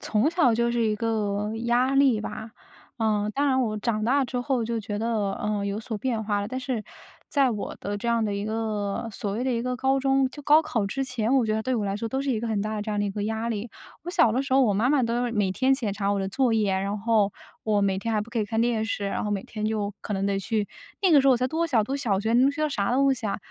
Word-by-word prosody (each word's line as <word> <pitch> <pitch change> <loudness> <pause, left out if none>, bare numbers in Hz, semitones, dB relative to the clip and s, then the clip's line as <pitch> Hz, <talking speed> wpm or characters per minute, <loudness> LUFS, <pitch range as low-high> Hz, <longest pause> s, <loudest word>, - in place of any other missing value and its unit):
从 225 +9 +1
小 325 -9 +3
就 235 +1 +1
是 240 - 0
一 215 - +1
个 210 -2 -1 0.2
压 250 +3 +2
力 270 -6 +4
吧。 220 +1 -6 0.4
呃， 210 -2 +1
当 285 +1 +1
然 260 -1 +2
我 215 -3 -1
长 215 -1 -1
大 270 +4 +3
之 245 0 -3
后 245 -2 0
就 230 0 -2
觉 205 -1 -4
得， 220 -3 0
呃， 210 -1 -2
有 200 +2 -2
所 220 -1 -5
变 230 -1 -1
化 205 -1 0
了， 200 - -3
但 255 +3 -4
是 250 -5 -3 0.4
在 275 -4 +3
我 210 -3 -4
的 205 +1 -3
这 235 - -5
样 230 -1 +2
的 205 - -1
一 200 +1 -3
个 215 0 -2
所 200 0 -4
谓 225 +5 -2
的 260 - 0
一 230 - 0
个 250 +1 -2
高 265 +2 +2
中， 270 0 +2
就 290 - -10
高 305 +3 +6
考 235 -10 -1
之 270 +7 -2
前， 250 -1 -1
我 255 -4 +4
觉 215 - 0
得 220 - 0
对 255 0 0
我 215 -3 -1
来 195 0 -1
说 225 +2 -3
都 265 +4 -2
是 275 - -1
一 225 - 0
个 235 - -3
很 220 -3 0
大 215 0 -3
的 210 - -2
这 215 0 -4
样 205 - 0
的 - - +1
一 200 - -1
个 205 +1 -3
压 220 +2 -2
力。 225 +1 -3 0.4
我 350 - -4
小 345 - +4
的 250 +4 +1
时 270 -1 -1
候， 270 - +6
我 215 - +3
妈 220 +6 +2
妈 285 -3 +3
都 240 +1 0
是 235 - -3
每 205 -4 +1
天 260 +7 +2
检 225 -7 -2
查 200 0 -1
我 200 - 0
的 190 - -2
作 245 +4 +1
业。 210 -3 +2
然 200 +2 -2
后 210 -2 +2 0.3
我 210 -2 +2
每 195 -1 +1
天 225 +2 -2
还 210 - +2
不 225 +3 -7
可 235 - -2
以 215 - +1
看 225 +2 -1
电 230 -2 +1
视， 220 -2 -3
然 195 - -2
后 210 - -2
每 195 -2 -2
天 215 -1 -6
就 210 -2 -1
可 210 - -5
能 195 0 -1
得 200 0 0
去 210 +1 -1 0.3
那 375 - +4
个 295 -4 +7
时 275 - +1
候 270 - +7
我 - - +3
才 255 +2 0
多 335 +3 0
小， 235 -8 +2
读 265 +6 -2
小 215 -9 0
学， 220 +2 0
能 260 +3 +5
学 305 +1 -3
到 305 - +2
啥 230 -5 -1
东 275 +1 +4
西 235 -4 -4
啊， 200 - -1
225 Hz, 320 characters per minute, -26 LUFS, 210-255 Hz, 0.4 s, 个